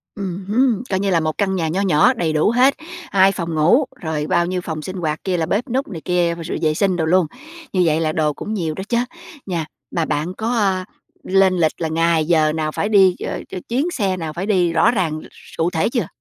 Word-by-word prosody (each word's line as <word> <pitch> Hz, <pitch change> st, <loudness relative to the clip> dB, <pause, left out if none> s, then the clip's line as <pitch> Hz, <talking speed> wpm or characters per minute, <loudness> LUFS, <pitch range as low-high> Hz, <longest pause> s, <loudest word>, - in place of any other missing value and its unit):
Ừm 190 Hz, -2 st, -5 dB
hứm. 235 Hz, +1 st, +2 dB
Coi 190 Hz, -1 st, 0 dB
như 200 Hz, 0 st, 0 dB
là 170 Hz, -3 st, +3 dB
một 155 Hz, -1 st, -2 dB
căn 190 Hz, -2 st, 0 dB
nhà 165 Hz, -3 st, -1 dB
nho 185 Hz, +5 st, -1 dB
nhỏ 195 Hz, -, +4 dB
đầy 170 Hz, -9 st, -1 dB
đủ 155 Hz, +6 st, +3 dB
hết, 255 Hz, +3 st, +4 dB, 0.4 s
2 195 Hz, 0 st, +5 dB
phòng 170 Hz, -4 st, -4 dB
ngủ, 175 Hz, -, +4 dB, 0.2 s
rồi 155 Hz, -2 st, -2 dB
bao 175 Hz, -, +2 dB
nhiêu 180 Hz, 0 st, -2 dB
phòng 160 Hz, -3 st, -5 dB
sinh 185 Hz, +4 st, -6 dB
hoạt 155 Hz, -3 st, -3 dB
kia, 185 Hz, -2 st, 0 dB
là 160 Hz, -, 0 dB
bếp 240 Hz, -, -1 dB
núc 265 Hz, +4 st, -1 dB
này 165 Hz, -8 st, -7 dB
kia, 175 Hz, -2 st, +1 dB
rồi 165 Hz, 0 st, -4 dB
vệ 155 Hz, -1 st, +2 dB
sinh 190 Hz, +2 st, +1 dB
đồ 160 Hz, -, 0 dB
luôn, 180 Hz, +1 st, +3 dB, 0.5 s
như 185 Hz, -, +2 dB
vậy 155 Hz, 0 st, +2 dB
là 155 Hz, -, +1 dB
đồ 155 Hz, -1 st, 0 dB
cũng 215 Hz, +8 st, -5 dB
nhiều 165 Hz, -6 st, -2 dB
đó 190 Hz, -, -5 dB
chớ, 235 Hz, -, +2 dB, 0.5 s
nha. 170 Hz, -5 st, -2 dB, 0.3 s
Mà 165 Hz, -2 st, 0 dB
bạn 155 Hz, +5 st, -2 dB
có, 220 Hz, +4 st, -4 dB
ờ, 195 Hz, -4 st, +1 dB, 0.4 s
lên 190 Hz, 0 st, +3 dB
lịch 160 Hz, -2 st, +3 dB
là 160 Hz, -, 0 dB
ngày, 165 Hz, 0 st, +1 dB
giờ 155 Hz, -2 st, +3 dB
nào 155 Hz, -1 st, -2 dB
phải 205 Hz, -, -2 dB
đi 190 Hz, -4 st, +5 dB
ch -, -, -6 dB, 0.3 s
chuyến 185 Hz, -, -6 dB
chuyến 280 Hz, +9 st, 0 dB
xe 195 Hz, -, -1 dB
nào 160 Hz, -3 st, -5 dB
phải 175 Hz, +4 st, -4 dB
đi 180 Hz, -5 st, +2 dB
rõ 165 Hz, +7 st, +4 dB
ràng 165 Hz, -8 st, -1 dB
s -, -, -16 dB
cụ 165 Hz, +2 st, +1 dB
thể 160 Hz, +3 st, 0 dB
chưa? 240 Hz, -1 st, -1 dB
180 Hz, 250 wpm, -20 LUFS, 160-200 Hz, 0.5 s, 2